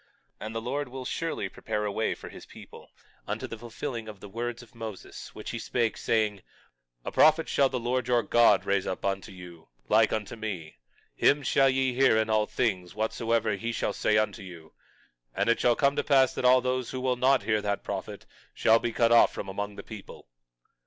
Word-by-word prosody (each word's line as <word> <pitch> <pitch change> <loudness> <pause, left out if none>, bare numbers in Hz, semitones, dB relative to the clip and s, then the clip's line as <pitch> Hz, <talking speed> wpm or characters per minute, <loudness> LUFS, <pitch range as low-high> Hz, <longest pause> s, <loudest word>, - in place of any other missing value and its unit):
22:20 - - -7
And 110 - -8
the 115 - -2
Lord 140 +5 -3
will 130 +1 -8
surely 160 -5 -3
prepare 105 +2 -4
a 105 - -1
way 110 +2 -1
for - - -10
his - - -12
people, - - -13 0.4
unto - - -3
the 115 - -8
fulfilling 115 0 -6
of 105 -2 -9
the 105 - -10
words 120 +3 -4
of 120 - -19
Moses, 110 -4 -9
which - - -6
he - - -4
spake, 115 -3 -1
saying: 105 -3 0 0.6
A - - -3
prophet 155 +1 +4
shall 140 -1 +3
the 130 - -2
Lord 125 +1 -1
your 120 -1 +2
God 110 -1 +4
raise 100 -1 0
up 95 - -4
unto 95 +1 -2
you, 90 -3 -12 0.2
like 110 0 +4
unto 110 +1 -3
me; 100 -8 -6 0.4
him 145 0 +3
shall 135 0 +3
ye 130 -1 +1
hear 130 -3 +4
in 110 0 +1
all 110 -1 +2
things 95 -7 -2
whatsoever 110 +1 0
he 115 +4 -3
shall - - -2
say 105 - +1
unto 110 0 0
you. 85 -4 -12 0.6
And 100 +4 +1
it 115 - +3
shall 120 -1 +3
come 140 +2 +2
to - - +1
pass 135 -3 +4
that - - -3
all 125 0 +6
those 130 -1 -2
who 130 - -4
will 130 0 0
not 130 +2 +3
hear 110 -1 +1
that 100 -1 -2
prophet - - -6 0.3
shall 115 +1 +4
be 120 - -2
cut 115 0 +2
off 120 - +6
from 100 - -6
among 100 +1 -4
the - - -8
people. 105 - -11
115 Hz, 215 wpm, -28 LUFS, 105-125 Hz, 0.6 s, all